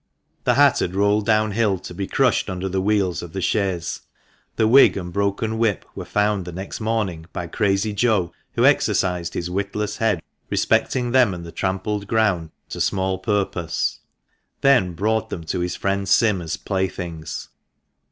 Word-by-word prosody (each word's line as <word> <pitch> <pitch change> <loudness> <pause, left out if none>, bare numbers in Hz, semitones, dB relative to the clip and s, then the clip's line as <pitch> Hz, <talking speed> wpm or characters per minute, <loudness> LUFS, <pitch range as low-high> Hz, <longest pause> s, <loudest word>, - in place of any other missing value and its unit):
The - - +3
hat - - +5
had 90 - -2
rolled 100 +1 +2
downhill, 110 -2 +2
to 90 - -9
be 95 +2 -4
crushed 130 -5 +2
under 95 0 -3
the 95 0 -1
wheels 100 -3 +1
of 85 -2 -9
the 95 - -3
chaise; 95 -3 -1 0.6
the 110 - +3
wig 130 0 +6
and 90 -2 -5
broken 100 +3 -1
whip 110 -4 +1
were 95 - -7
found 105 +2 +1
the 90 - -7
next 95 +3 -6
morning 105 -7 -2
by 90 - -3
Crazy 100 +4 0
Joe, 100 -5 +1 0.2
who - - +2
exercised 90 -2 +2
his 85 - -2
witless 100 +2 -2
head 105 -6 +1 0.3
respecting 125 -2 +1
them 120 -7 +4
and 85 -1 -8
the 85 - -8
trampled 100 +3 -2
ground 100 -7 +1 0.2
to - - -5
small 95 -1 0
purpose; 95 -6 -1 0.6
then 125 -11 +4
brought 110 +5 0
them 85 - -5
to 85 +3 -3
his 90 0 -2
friend 100 -1 -1
Sim 105 -4 +3
as 80 -2 -4
playthings. 90 -5 -4
95 Hz, 165 wpm, -22 LUFS, 90-105 Hz, 0.6 s, wig